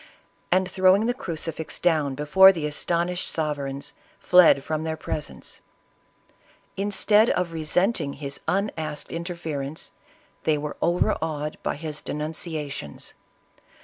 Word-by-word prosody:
and, 185 +1 +3
throwing 190 +3 +4
the 245 - +1
crucifix 165 - -4
down 155 -6 +1
before 170 +7 +7
the 165 -5 -4
astonished 170 +4 -1
sovereigns, 140 -3 -3 0.2
fled 180 -6 +6
from 155 +1 -2
their 160 0 -3
presence. 150 -1 -6 1.1
In 200 +1 -1
stead 210 +2 +4
of 180 -2 0
resenting 160 0 0
his 140 -1 -5
unasked 160 -7 -2
interference, 160 -4 -5 0.5
they 155 -1 +2
were 150 0 -5
overawed 155 -3 0
by - - -2
his 155 0 -4
denunciations. 150 - -4
160 Hz, 115 wpm, -25 LUFS, 150-180 Hz, 1.1 s, before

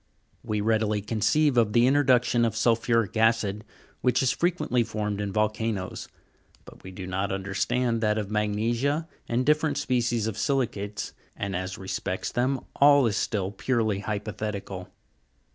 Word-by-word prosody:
We 105 -1 -2
readily 110 -1 +1
conceive 125 +7 +1
of 110 -3 +3
the 120 0 +5
introduction 125 -3 +3
of 115 -3 0
sulphuric 115 -3 +1
ac;d, 110 -2 +2 0.4
which 125 +1 +2
is 130 - +3
frequently 170 -9 +1
formed 105 -2 -3
in 100 -1 -3
volcanoes; 110 -2 -2 0.6
but - - -14
we 95 - -10
do 95 0 -7
not 95 +2 -2
understand 110 +5 -1
that 105 -1 +1
of 105 -1 -3
magnesia 115 +9 0 0.2
and 120 +2 +1
diffe 150 +1 +4
rent 155 -2 0
species 120 -3 0
of 110 -3 -3
si'licates, 105 -7 -1 0.3
and, 100 -2 -3
as 95 +1 -4
respects 95 0 -3
them, 130 +2 0 0.2
all 140 -1 +6
is 110 -3 +1
still 100 -2 -1
purely 110 -2 0
hypothetical. 105 -2 -4
110 Hz, 145 wpm, -26 LUFS, 100-125 Hz, 0.6 s, all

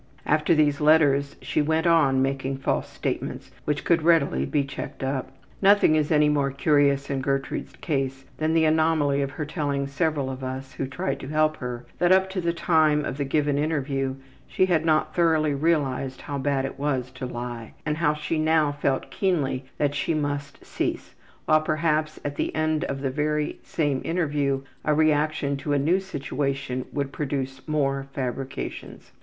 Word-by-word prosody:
'' - - -29
After 155 +2 +3
these 150 -1 +2
letters 145 -2 +4
she - - 0
went 160 +2 +1
on 150 -6 +4
making 135 0 -2
false 135 - -1
statements - - -4
which 150 0 -1
could 170 -1 +3
readily 150 - +3
be 145 - +1
checked 135 0 -7
up. 130 0 -2 0.3
Nothing 200 -5 +5
is 155 0 +1
any 150 -1 +5
more 145 -2 +2
curious 140 0 +2
in 135 -1 -1
Gertrude's 135 0 -2
case 135 -4 -2
than 155 +1 0
the 160 -1 +4
anomaly 155 -3 +2
of 140 - -1
her 150 +2 -5
telling 145 -3 -2
several 140 -1 -1
of 130 0 -7
us 130 +1 -5
who 135 - -3
tried 135 0 -3
to 130 - -7
help 155 +1 +1
her 125 -1 -5
that 175 0 +3
up 190 0 +4
to 190 -1 -2
the 170 0 +1
time 155 -3 +2
of 135 - -4
the - - +1
given 145 0 +1
interview 135 -3 -1 0.3
she 185 - +2
had 170 -4 +2
not 155 -1 +2
thoroughly 160 -3 +3
realized 140 -3 0
how 140 -1 -4
bad 135 -1 0
it 135 - -6
was 135 -3 -1
to 130 0 -6
lie, 120 -2 -6
and 150 0 -1
how 150 -2 +2
she 150 +1 -2
now 155 -1 +3
felt 140 -2 -1
keenly 140 -9 0
that 145 -1 +1
she 145 +3 -1
must 145 -1 -3
cease, - - -3 0.3
while 155 0 +4
perhaps 155 0 0
at 145 0 -3
the - - -2
end 155 0 +1
of 135 -4 -4
the 135 -2 -1
very 150 +1 -1
same 145 -5 -1
interview 145 -5 0 0.2
a 150 - +2
reaction 150 -2 +2
to 140 +2 -2
a - - +3
new 165 +7 +2
situation 140 -6 -3
would 140 -2 -2
produce 135 -2 -4
more 140 -3 0
fabrications. 130 0 -5
145 Hz, 180 wpm, -25 LUFS, 135-155 Hz, 0.3 s, Nothing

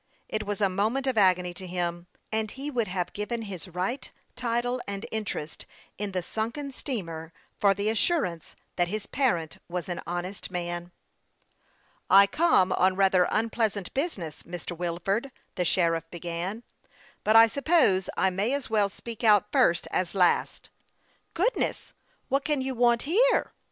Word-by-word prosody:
It 215 -1 -3
was 205 +1 -3
a 200 - +5
moment 215 +8 0
of 260 -2 0
agony 180 -3 +3
to 185 +1 -8
him, 175 -1 -3 0.2
and 220 0 -1
he 275 +6 -6
would 235 -5 0
have 180 -1 -3
given 225 +3 -3
his 195 -3 -7
right, 185 +9 -3 0.2
title, 245 +1 -1
and 200 0 -4
interest 205 -8 -4 0.3
in 205 -1 -3
the 185 -2 -2
sunken 235 - -3
steamer 165 - -5 0.3
for 200 -1 +4
the 200 +2 -2
assurance 220 - 0 0.2
that 175 -1 +2
his 210 +3 -3
parent 175 - 0
was 180 -1 -3
an 175 - -3
honest 175 +3 -4
man. 175 -1 -4 0.6
" - - -37
I 195 +1 +8
come 200 - +3
on 185 0 +3
rather 190 -2 +4
unpleasant 220 -3 0
business, 205 - -3
Mr. 175 0 -6
Wil 170 0 -3
ford," 225 +8 0 0.2
the 180 - -1
sheriff 165 -2 +1
began; 175 +6 -4 0.3
" - - -28
but 215 - +3
I 225 0 +10
suppose 265 - +2
I 190 - +3
may 200 +7 0
as 280 -5 -3
well 210 -2 +3
speak 230 +3 -9
out 210 -3 +5
first 170 - +3
as 185 +1 -1
last." 180 -2 +2 0.3
" - - -39
Goodness! 425 +9 0 0.3
what 275 +1 +1
can 295 -3 0
you 265 0 -2
want 240 -1 +3
here 455 - +3
200 Hz, 165 wpm, -27 LUFS, 180-235 Hz, 0.6 s, I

